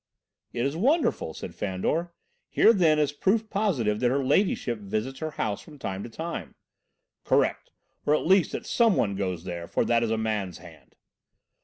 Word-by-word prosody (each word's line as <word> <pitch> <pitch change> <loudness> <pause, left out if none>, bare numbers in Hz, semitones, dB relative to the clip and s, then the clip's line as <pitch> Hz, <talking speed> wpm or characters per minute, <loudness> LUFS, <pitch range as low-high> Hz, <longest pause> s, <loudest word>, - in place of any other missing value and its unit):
"It 120 - -1
is 140 +2 -1
wonderful," 255 - +1
said 85 - -7
Fandor. 105 - -2 0.4
"Here, 230 - +5
then, 165 -7 +4
is 150 -2 +2
proof 215 +8 0
positive 135 - 0
that 125 - +2
her 135 +1 0
Ladyship 130 - +1
visits 110 +6 -3
her 155 - -3
house 105 -8 -3
from 150 -2 -14
time 95 -7 -4
to 120 - -7
time." 165 +8 -6 0.7
"Correct - - +1 0.4
or 150 - +5
at - - -1
least 190 0 +4
that - - -4
some 230 -5 +3
one 100 -2 +1
goes 90 -4 -3
there, 85 -2 -6
for - - 0
that 120 -1 +3
is 115 - 0
a 110 - 0
man's 105 -5 -2
hand." - - -16
130 Hz, 180 wpm, -27 LUFS, 105-170 Hz, 0.7 s, Here